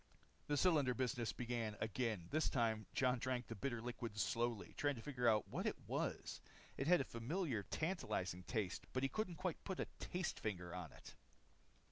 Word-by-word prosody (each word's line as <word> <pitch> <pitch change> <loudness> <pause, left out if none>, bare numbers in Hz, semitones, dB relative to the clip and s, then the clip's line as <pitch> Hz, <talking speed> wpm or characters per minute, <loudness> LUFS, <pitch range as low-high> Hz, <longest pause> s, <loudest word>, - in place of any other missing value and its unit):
The 145 - +2
cylinder 145 -7 +5
business 120 -3 +1
began 115 -3 -2
again. 110 -3 0
This 155 +1 +3
time, 110 -4 +1
Jon 125 -1 +4
drank 125 -1 0
the - - -5
bitter 120 +2 -1
liquid 120 -3 -4
slowly, 120 -2 +1
trying 145 -1 +2
to 115 - -7
figure 125 -5 +3
out 105 -2 +3
what - - -1
it - - +1
was. - - -1 0.3
It 135 - -1
had 175 -2 +7
a - - -1
familiar, 125 - -1
tantalizing 100 - -1
taste 105 -5 -1
but 130 - +1
he 135 - +3
couldn't 215 -2 -1
quite 185 -1 -2
put 190 -2 -3
a - - +1
taste 180 -1 -2
finger 90 -5 -2
on 90 -5 -4
it. - - -11
120 Hz, 180 wpm, -42 LUFS, 110-145 Hz, 0.3 s, had